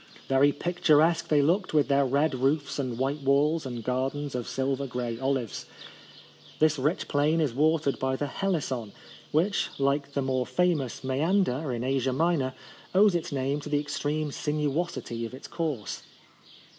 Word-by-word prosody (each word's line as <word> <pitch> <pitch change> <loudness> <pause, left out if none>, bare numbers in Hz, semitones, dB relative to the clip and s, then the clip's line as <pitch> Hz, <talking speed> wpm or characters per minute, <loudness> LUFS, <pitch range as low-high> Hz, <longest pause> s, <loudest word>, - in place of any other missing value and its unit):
Very 135 +2 +4
picturesque 165 0 +2
they 150 -3 +3
looked 175 +3 +1
with 150 - +4
their 140 -1 +3
red 145 +4 +2
roofs 140 +3 0
and 125 -4 -2
white 135 +3 -1
walls, 145 +3 +2
and 120 -2 -5
gardens 135 +3 -2
of 125 -2 -3
silver 135 +1 -1
grey 120 -2 -4
olives. 130 -4 -2 0.9
This 155 -2 +3
rich 150 +7 0
plain 150 +3 +2
is 150 -7 +1
watered 155 +1 +2
hy 130 0 +1
the 145 - -2
Helis 180 +1 -1
son, 115 -6 -4 0.4
which, 180 +7 +1
like 140 +1 0
the 140 - 0
more 130 -1 0
famous 165 -9 0
Moeander 145 0 +1
in 120 -1 -3
Asia 130 0 0
Minor, 140 -4 +1 0.4
owes 200 0 +6
its 170 -2 -2
name 140 +1 -1
to 150 - -8
the 145 -1 +2
extreme 145 +1 -2
sinuosity 150 -4 -2
of 115 +2 -5
its 130 - -10
course. 155 - -3
140 Hz, 160 wpm, -27 LUFS, 130-155 Hz, 0.9 s, owes